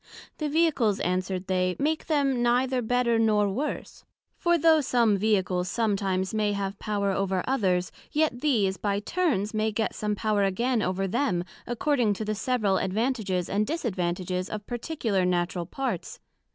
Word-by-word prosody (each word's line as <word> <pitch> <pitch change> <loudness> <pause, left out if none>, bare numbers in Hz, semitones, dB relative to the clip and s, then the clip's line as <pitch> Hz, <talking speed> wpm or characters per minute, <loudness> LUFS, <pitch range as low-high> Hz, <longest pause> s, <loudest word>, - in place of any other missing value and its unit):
The 305 -1 -1
Vehicles, 290 -10 +2
answered 185 +1 -1
they, 185 -1 0
make 310 +3 -1
them 275 -5 +1
neither 250 +2 +2
better, 235 0 +1
nor 210 -2 +3
worse; 265 +10 -4 0.3
for 345 0 +2
though 320 -1 +5
some 235 -5 +3
Vehicles 190 -3 +1
sometimes 195 -4 0
may 210 -1 +1
have 200 0 -3
power 200 -2 -1
over 190 -1 0
others, 190 -9 +1 0.2
yet 300 -5 0
these 210 -10 +2
by 200 -1 -1
turns 215 - 0
may 215 0 0
get 220 +1 -1
some 210 -1 -2
power 210 0 0
again 230 +5 +1
over 195 0 -1
them, 195 -5 0 0.2
according 240 -2 +1
to 215 - -4
the 215 - -1
several 215 -3 +1
advantages 200 -3 -1
and 210 +2 0
disadvantages 185 - -2
of 210 -1 -5
particular 240 - -1
Natural 175 -1 0
parts. 270 +7 -4
215 Hz, 150 wpm, -27 LUFS, 190-250 Hz, 0.3 s, though